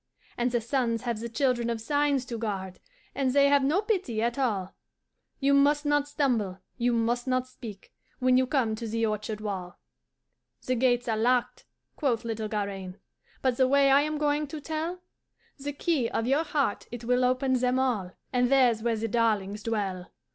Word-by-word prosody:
"'And 240 +1 0
the 240 -1 +1
suns 235 -1 -1
have 235 -3 -2
the 235 +1 -5
Children 240 0 0
of 230 -1 -2
Signs 285 +2 +1
to 240 -2 -5
guard, 190 -4 -4 0.3
And 265 -2 0
they 280 0 +5
have 285 -1 +4
no 320 +10 +2
pity 375 - -1
at 235 +3 -1
all 200 -8 -1 0.7
You 280 0 +3
must 290 +2 +4
not 290 0 +2
stumble, 240 -11 0 0.2
you 245 0 +1
must 240 +2 0
not 255 0 +1
speak, 225 -6 -11 0.2
When 255 0 +3
you 255 0 +3
come 250 -5 +1
to 230 0 -5
the 225 +1 0
orchard 215 0 -3
wall. 190 -4 -5 0.9
"'The 255 - +1
gates 245 0 +2
are 225 - +1
locked,' 245 +3 +1 0.3
quoth 240 -6 0
little 220 -1 -3
Garaine, 195 -3 -4 0.5
'But 255 -2 +1
the 260 - +4
way 275 0 +4
I 275 +1 +6
am 305 +1 -1
going 295 0 0
to 310 +2 -6
tell? 320 +4 -4 0.6
The 285 +1 -4
key 285 -4 0
of 225 - -1
your 280 +6 +2
heart 285 -8 -1
it 240 -1 -7
will 250 +2 +2
open 255 +1 +2
them 250 0 +2
all: 225 -9 0 0.2
And 250 -1 +2
there's 250 -5 +4
where 235 0 +1
the 225 +1 -2
darlings 210 -3 0
dwell! 200 -5 -2
245 Hz, 185 wpm, -28 LUFS, 225-275 Hz, 0.9 s, I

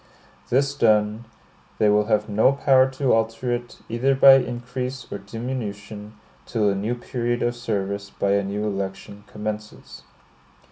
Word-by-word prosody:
This 135 +2 +2
done, 110 -3 +2 0.5
they 110 - +3
will 105 0 +3
have 105 -1 +1
no 110 +5 +3
power 135 -1 +4
to 130 0 0
alter 115 +2 0
it, 120 0 -5
either 130 +4 +1
by 135 0 +8
increase 125 +1 -5
or - - -4
diminution, 105 -1 -6 0.3
till 105 -3 +1
a - - -1
new 105 +5 -2
period 120 0 -2
of 120 0 0
service 100 -4 -3
by 100 - -1
a 100 0 +2
new 100 +2 -3
election 100 0 -5
commences. 105 0 -7
110 Hz, 145 wpm, -23 LUFS, 105-125 Hz, 0.5 s, by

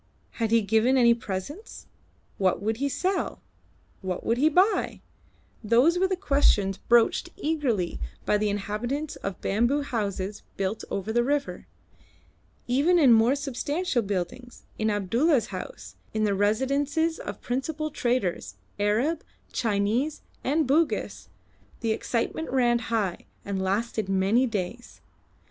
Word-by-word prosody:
Had 225 -1 +1
he 230 0 +4
given 225 +6 +3
any 235 -2 +6
presents? 235 - -6 0.5
What 190 -2 +2
would 220 +3 -1
he 280 +3 0
sell? 370 +6 -1 0.6
What 185 -2 -4
would 230 +2 +1
he 305 +3 +5
buy? 370 +7 +2 0.6
Those 250 +11 +4
were 380 - +3
the 375 - 0
questions 275 - +2
broached 235 -1 +3
eagerly 280 - -1 0.3
by 210 - +2
the 210 0 +1
inhabitants 220 +9 -3
of 195 -2 -5
bamboo 240 +8 +1
houses 205 -5 -3 0.2
built 195 +2 -2
over 200 +3 -3
the 240 +1 +3
river. 285 +2 -2 1.0
Even 285 +9 +3
in 275 -8 +7
more 230 +4 +4
substantial 285 +2 -1
buildings, 205 +5 -4 0.2
in 220 0 +1
Abdulla's 230 - +2
house, - - -8 0.2
in 215 - +1
the 205 -2 +2
residences 275 +10 +1
of - - -6
principal 310 +5 -3
traders, 235 - -1 0.2
Arab, 235 +11 +1 0.3
Chinese, 225 +7 0 0.2
and 300 +4 +1
Bugis, 300 +5 0 0.5
the 225 -2 0
excitement 235 +8 -2
ran 240 -2 +3
high, 210 -6 -1 0.2
and 195 -1 -2
lasted 205 +2 -1
many 195 +7 +3
days. 220 +2 -5
235 Hz, 130 wpm, -26 LUFS, 205-285 Hz, 1.0 s, in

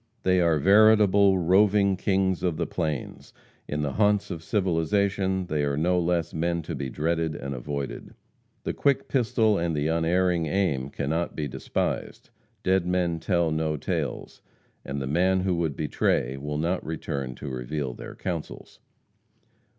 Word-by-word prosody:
They 95 -1 +3
are 85 -2 +3
veritable 100 +1 +5
roving 100 +3 +4
kings 95 -1 0
of 85 -4 -1
the 85 - -1
plains. 80 -6 -4 0.3
In 75 0 -2
the 70 - -1
haunts 105 -1 +2
of 85 -2 -5
civilization 95 +1 0
they 75 -3 -1
are 70 -1 0
no 90 +3 +2
less 85 -1 0
men 85 +1 -1
to 85 - -5
be 70 -2 -4
dreaded 80 +2 -1
and 70 +2 -5
avoided. 70 +2 -5 0.5
The - - -2
quick 140 -1 +1
pistol 115 -5 +2
and 85 -1 -1
the 75 0 -1
unerring 85 +1 +1
aim 75 -7 0
cannot 80 +5 -2
be 75 -2 -2
despised. 65 - -3 0.3
Dead 95 -1 +2
men 90 -2 0
tell 85 0 +1
no 80 0 -1
tales, - - -4 0.4
and 70 0 -4
the 65 - -3
man 90 +6 +2
who 95 0 0
would 80 -4 -1
betray 70 -3 0
will 75 +2 -4
not 85 +4 -1
return 70 -5 -4
to 70 - -7
reveal 65 +1 -4
their - - -9
counsels. 85 -4 -6
85 Hz, 155 wpm, -26 LUFS, 75-95 Hz, 0.5 s, veritable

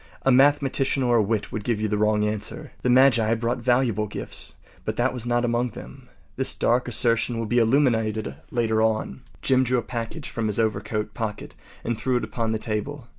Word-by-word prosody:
A 135 - +4
mathematician 135 0 +3
or 120 -1 +3
a - - +4
wit 105 0 -1
would 110 - -4
give 115 -1 -1
you 110 - 0
the 105 - -1
wrong 105 0 +2
answer. 105 -1 -4
The 125 - 0
magi 120 -3 +5
brought 115 +2 -1
valuable 120 -4 +1
gifts, - - -4 0.3
but - - -3
that 120 +2 +1
was 120 -2 -5
not 120 0 +1
among 120 +1 0
them. - - -12 0.3
This - - +1
dark 125 +1 +1
assertion 115 0 +1
will 115 - -2
be 120 +3 +2
illuminated 110 - +1 0.2
later 110 -2 +1
on. 110 -11 0 0.2
Jim 130 -1 +3
drew 125 0 +1
a 120 - -1
package 120 +5 -5
from 115 -2 -2
his 105 - 0
overcoat 105 -1 -1
pocket 110 -2 -5 0.3
and 120 -2 -2
threw 130 -1 +1
it 120 - -3
upon 110 +1 -2
the 110 - 0
table. 120 +5 -4
115 Hz, 200 wpm, -24 LUFS, 110-125 Hz, 0.3 s, magi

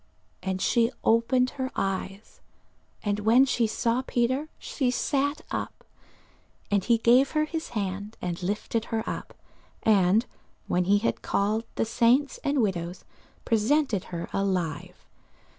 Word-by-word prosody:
And 190 0 -2
she 235 0 +3
opened 250 +3 +3
her 260 -2 -3
eyes: 195 +1 -4 0.6
and 205 -1 0
when 230 +5 +5
she 240 -3 +1
saw 230 +3 0
Peter, 260 +4 0
she 260 -4 -2
sat 285 +3 0
up. - - -4 0.9
And 200 -2 +2
he 235 +2 +3
gave 245 +4 +4
her 305 -1 +2
his 320 +1 -5
hand, 200 +2 -4
and 175 -1 -4
lifted 210 +4 -2
her 225 -1 -3
up, - - -5 0.5
and 205 +1 +4 0.4
when 180 0 +1
he 200 +2 +4
had 210 - -1
called 215 +3 0
the - - +1
saints 240 +5 +2
and 280 -3 +2
widows, 180 -3 -3 0.4
presented 230 - +1
her 170 -1 -5
alive. 180 -6 -2
225 Hz, 135 wpm, -27 LUFS, 195-255 Hz, 0.9 s, when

